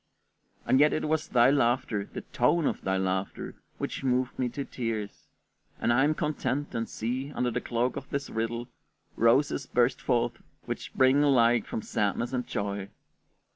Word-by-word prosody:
And 130 - +4
yet 150 +1 +5
it 155 - -1
was 155 0 0
thy 125 +1 +5
laughter, 120 -6 +1
the - - -5
tone 170 -2 +1
of - - -1
thy 95 0 0
laughter, 95 0 -2 0.2
which - - -4
moved 130 -1 0
me 125 -1 +1
to 140 +3 -5
tears; 110 -4 -4 0.5
and 120 - +2
I 125 +3 +4
am 155 +1 +2
content, 145 -1 -2
and 115 0 -2
see, 130 +5 -3
under 125 -1 0
the - - -2
cloak 120 +1 -1
of 135 - -7
this 140 -1 -2
riddle, 115 +2 -3 0.5
roses 130 +4 +3
burst 120 +1 +2
forth 120 0 0 0.2
which - - -4
spring 130 +2 +3
alike 120 -5 +4
from 110 - -4
sadness 105 +4 -1
and 125 -1 -2
joy. 100 -1 -3
125 Hz, 170 wpm, -28 LUFS, 115-135 Hz, 0.5 s, yet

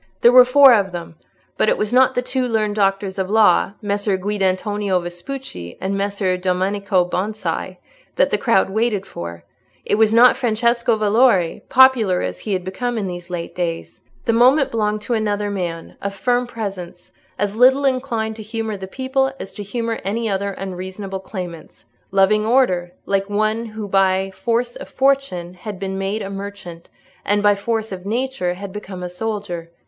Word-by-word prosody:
There 240 - +7
were 250 0 +9
four 270 +1 +7
of 200 -4 +2
them; 170 -2 -7 0.4
but 215 - +3
it - - +2
was 210 +2 -2
not 260 +1 +4
the 250 - 0
two 255 0 -1
learned 215 -3 0
doctors 195 -1 0
of 190 0 -2
law, 210 -2 +4
Messer 205 -1 0
Guidantonio 200 0 0
Vespucci 175 - -7
and 195 +1 -2
Messer 200 -2 -1
Domenico 190 +1 0
Bonsi, 185 -1 -3 0.4
that - - +2
the - - +2
crowd 195 -5 +2
waited 215 -2 0
for; 85 0 -8 0.4
it 210 - +1
was 220 -1 +5
not 240 +2 +6
Francesco 235 -1 +1
Valori, 210 -4 +3
popular 245 -8 +5
as 90 0 -4
he 210 - -3
had 185 -1 -1
become 240 +6 -3
in 210 - -2
these 175 -1 -6
late 175 -2 -5
days. 170 -2 -4 0.2
The 230 - +2
moment 260 +4 +4
belonged 215 -2 -1
to 240 - -2
another 210 -2 -1
man, 170 -4 -5
of 200 0 -4
firm 245 +4 0
presence, 195 -7 -7 0.3
as 205 0 -1
little 260 +4 +5
inclined 235 -5 -1
to - - -7
humour 220 0 -4
the 190 0 -7
people 265 +4 -1
as 195 - -7
to 210 - -7
humour 230 +2 -3
any 225 +4 -2
other 200 -1 -1
unreasonable 190 +1 -6
claimants—loving 185 - -2
order, 200 -8 +2
like 195 0 0
one 215 +2 0
who 215 -1 -6
by 195 0 +2
force 235 +4 -1
of - - -9
fortune 265 -11 0
had 195 +2 -8
been 190 0 -4
made 200 +3 -2
a 195 - -5
merchant, 195 -4 -8 0.3
and 205 +1 +1
by 205 0 +6
force 220 +2 -2
of 185 -1 -6
nature 225 -4 -2
had 195 0 -8
become 195 -3 -7
a - - -3
soldier. 180 -4 -4
205 Hz, 175 wpm, -20 LUFS, 190-230 Hz, 0.4 s, were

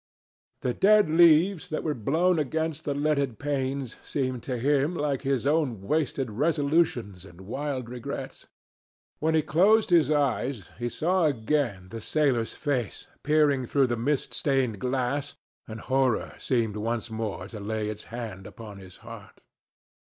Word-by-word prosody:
The 125 - 0
dead 210 - +4
leaves 170 +2 +5
that 155 - -3
were 155 - 0
blown 160 - +1
against 160 +1 -2
the 145 - -1
leaded 140 -5 0
panes 135 -3 -2
seemed 130 -3 -2
to 125 - -1
him 145 +6 +1
like 145 -4 -1
his 135 -2 -1
own 140 -9 +1
wasted 135 -1 -1
resolutions 140 - 0
and 90 -1 -14
wild 130 +4 -4
regrets. 120 0 -7 0.7
When 160 +1 +1
he 155 - +3
closed 200 +8 +3
his 165 -5 +5
eyes, 135 -6 0
he 120 0 -2
saw 175 +6 +1
again 120 -7 0
the 115 +2 -7
sailor's 130 -5 0
face 130 -8 -2 0.2
peering 145 -4 +2
through 140 +2 +3
the 120 -1 -1
mist 135 +5 -1
stained 130 -7 0
glass, 130 +3 -1 0.3
and 110 0 -7
horror 130 0 0
seemed 115 -5 0
once 115 +2 -3
more 110 -4 -4
to 110 - -8
lay 105 +1 -3
its 105 0 -6
hand 110 -5 -7
upon 105 -4 -10
his 95 -1 -13
heart. - - -12
135 Hz, 150 wpm, -27 LUFS, 115-150 Hz, 0.7 s, leaves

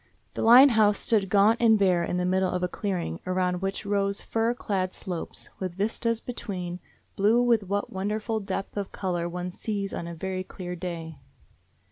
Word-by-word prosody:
The - - -4
Line 250 +5 +9
House 215 -4 +4
stood 205 -4 +1
gaunt 210 +4 +4
and 225 -2 +6
bare 185 -4 +3
in 175 - -2
the 180 - 0
middle 185 0 +2
of 180 0 -2
a - - +2
clearing, 180 - -3
around 180 -1 0
which 195 +1 -3
rose 200 0 0
fir 230 +1 0
clad 190 -6 -2
slopes, 175 -3 -5
with 185 -2 -4
vistas 225 +3 0
between, 185 -8 -5 0.4
blue 215 +4 +4
with 230 -5 +2
that 205 0 -1
wonderful 210 +3 -2
depth 195 0 -5
of 200 -1 -3
color 175 -3 -2
one 180 +1 -4
sees 200 +1 -3
on 170 - -4
a 170 - -6
very 185 +2 -3
clear 180 -1 -7
day. 165 -4 -6
195 Hz, 180 wpm, -27 LUFS, 180-215 Hz, 0.4 s, Line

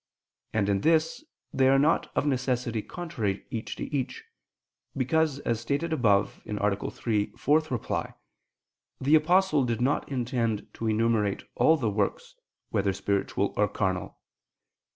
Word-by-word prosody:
And 105 -3 +1
in 100 -1 +1
this 160 - +2 0.3
they 130 -1 +4
are 135 - +5
not 150 +4 +2
of - - +1
necessity 125 -4 0
contrary 115 - -4
each 115 -1 -4
to - - -5
each: 140 - -3 0.7
because, 150 +2 +1
as 115 -4 -1
stated 145 +7 -1
above 105 -8 +2
(A. 105 -1 -1
3, 110 -3 0
ad - - -23
4), 150 -4 0 0.9
the 140 +3 +1
Apostle 165 -1 +3
did 115 -2 -1
not 135 +3 0
intend 120 -4 -1
to 115 - -4
enumerate 110 -2 +1
all 160 - +4
the 115 -7 -1
works, 100 -1 -2 0.4
whether 100 -1 +1
spiritual 100 +1 -1
or 105 - +3
carnal. 95 -3 -2
120 Hz, 135 wpm, -27 LUFS, 105-145 Hz, 0.9 s, are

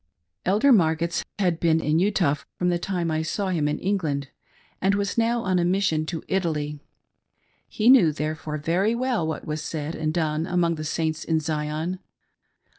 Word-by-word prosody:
Elder 215 +9 +4
Margetts 170 -5 +2
had 180 -5 +1
been 165 -1 +3
in 155 0 +1
Utah 185 -6 +2 0.2
from 180 - +1
the 175 -1 +1
time 175 -2 -2
I 155 0 0
saw 190 +5 -2
him 160 -5 0
in 150 - -1
England, 155 -8 -1 0.5
and 195 +1 +3
was 200 0 -1
now 230 0 +1
on 185 -1 +1
a - - +2
mission 175 -4 +1
to 165 -2 -4
Italy. 150 -6 -1 0.9
He 215 - -1
knew, 245 -11 +7
therefore, 155 0 -4
very 180 +9 +1
well 240 -9 0
what 160 - -4
was 155 0 -3
said 155 0 -4
and 155 -1 -2
done 160 -1 -1
among 175 -1 +1
the 155 -1 -5
Saints 155 0 -2
in 160 -1 +1
Zion. 155 +3 -3
165 Hz, 175 wpm, -25 LUFS, 155-190 Hz, 0.9 s, knew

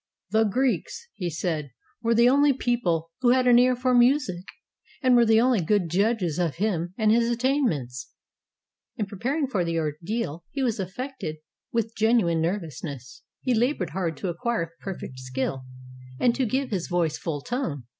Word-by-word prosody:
"The 220 0 +4
Greeks," 270 - -1 0.2
said 160 -2 -2
he, 140 - -19 0.3
"were 230 0 +2
the 235 +1 +6
only 285 +2 +5
people 180 -11 -1
who 250 -2 +3
had 255 +1 +4
an 245 -1 +7
ear 250 0 +4
for 250 +1 +1
music, 245 -7 +3 0.6
and 255 -1 +5
were 235 -1 +5
the 220 0 +5
only 245 -3 +3
good 180 +1 +1
judges 195 -3 +1
of 170 -4 0
him 175 -3 -1
and 215 -2 +3
his 230 +1 +3
attainments." 235 - 0 0.9
In 210 - -1
preparing 250 +10 -2
for 210 -9 -1
the 170 -1 -1
ordeal 165 +3 -3
he 270 - -3
was 235 -3 0
affected 195 - -5 0.4
with 230 -1 -1
gen 225 +2 +3
uine 170 -5 +1
nervousness. 155 - -4 0.2
He 255 - +1
labored 230 - 0
hard 165 -3 -2
to 185 - -3
acquire 175 -1 -2
perfect 175 -9 -7
skill 130 0 -3 0.5
and 240 +6 +3
to 260 0 0
give 265 +4 -1
to 210 - -1
his 175 - -5
voice 170 -3 0
full 150 -4 -3
tone. 170 - -3
210 Hz, 175 wpm, -25 LUFS, 165-245 Hz, 0.9 s, an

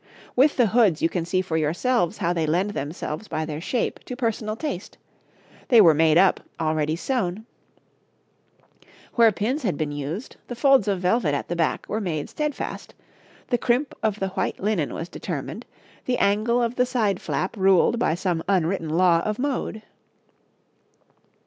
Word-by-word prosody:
With 280 +4 +4
the 245 - +5
hoods 210 -6 +3
you 165 - +4
can 170 -2 -2
see 185 +1 0
for 165 -3 -2
yourselves 175 +6 0
how 175 -3 0
they 165 -2 -1
lend 180 +6 +1
themselves 155 +3 -5
by 155 - -2
their 155 0 -5
shape 240 +7 -2
to 250 - -6
personal 225 -3 -2
taste; 225 - -5 0.7
they 240 - +6
were 170 -7 +8
made 160 +1 +4
up, 190 +1 +4 0.2
all 155 -1 +1
ready 155 0 0
sewn; 210 -1 -2 1.7
where 230 -2 +5
pins 235 +9 -2
had 190 - -1
been 155 -2 -2
used, 145 - -5
the 245 - -6
folds 270 -4 +4
of 195 -3 0
velvet 180 -5 +1
at - - -4
the 175 - -1
back 165 -2 0
were 220 - -2
made 160 -7 -3
steadfast, 300 -2 -4 0.5
the 245 - +1
crimp 250 +3 +1
of 215 -2 0
the 195 - -1
white - - -2
linen 195 -7 0
was 165 - -5
determined, - - -6 0.4
the 250 -1 0
angle 220 +4 +2
of 235 +1 -2
the 250 - +3
side 215 -7 0
flap 185 - -2
ruled 195 +3 +3
by 165 -9 +1
some 175 -2 -1
unwritten 180 -3 +1
law 170 +1 +4
of 215 +4 -2
mode. 255 -5 -3
195 Hz, 170 wpm, -24 LUFS, 165-235 Hz, 1.7 s, were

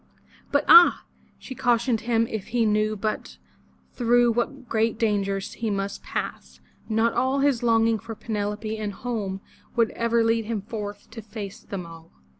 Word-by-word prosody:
But - - +2
ah! 455 - +8 0.3
she 260 - -9
cautioned 240 -2 +1
him 230 0 +1
if 220 -3 -5
he 235 0 +1
but - - +3
knew 215 +1 +1 1.0
through 240 -1 +3
what 245 +3 -2
great 225 -1 0
dangers 200 -3 -1
he 230 -2 -3
must 195 -1 -3
pass, - - -5 0.3
not 225 +1 +2
all 260 +3 +1
his 275 -4 +2
longing 225 -1 +3
for 225 +1 -8
Penelope 215 0 -3
and 210 -1 -3
home 200 -4 -4 0.3
would 230 -2 +2
ever 235 0 +1
lead 225 0 +1
him 215 -3 -3
forth 205 -2 -7
to 225 0 -8
face 205 -2 -8
them 190 -3 -7
all. 165 0 -13
225 Hz, 160 wpm, -25 LUFS, 210-235 Hz, 1.0 s, ah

